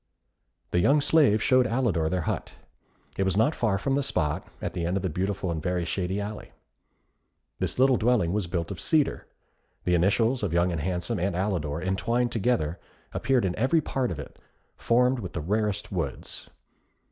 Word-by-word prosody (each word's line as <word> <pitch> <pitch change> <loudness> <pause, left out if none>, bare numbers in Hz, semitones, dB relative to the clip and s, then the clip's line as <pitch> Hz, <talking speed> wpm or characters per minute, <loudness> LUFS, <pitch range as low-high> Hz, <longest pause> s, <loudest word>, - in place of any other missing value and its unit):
The 90 - +2
young 140 +11 +4
slaves 140 -8 +4
showed 130 -1 +4
Alidor 115 -11 +1
their 90 0 0
hut. - - -3 0.6
It - - +3
was 95 0 +1
not 115 +9 +3
far 110 -8 +1
from 135 +8 -1
the 140 - +2
spot, 85 - -1
at - - -4
the 85 - -3
end 90 +3 0
of 95 - -3
a - - +1
beautiful 95 +2 -2
and 80 -2 -3
very 90 0 -1
shady 95 +2 -2
alley. 105 +1 -6 1.1
This - - -2
little 130 0 +5
dwelling 110 -7 +2
was 105 -4 -1
built 85 0 -3
of 90 -4 -6
cedar. 155 -3 +1 0.6
The 90 - +1
initials 110 +8 +2
of - - -1
Young 85 +1 +2
and 80 -3 -2
Handsome 90 +6 -2
and 95 +1 0
Alidor 85 -5 -1
entwined 115 +6 0
together, 110 -8 0 0.3
appeared 130 -5 +1
in 90 -2 -1
every 130 +9 +3
part 135 -4 -1
of 85 - -4
it, 70 - -9 0.4
formed 125 +2 +2
with 90 -6 -6
the - - -3
rarest 105 +4 -1
woods. - - -4
100 Hz, 180 wpm, -27 LUFS, 90-120 Hz, 1.1 s, little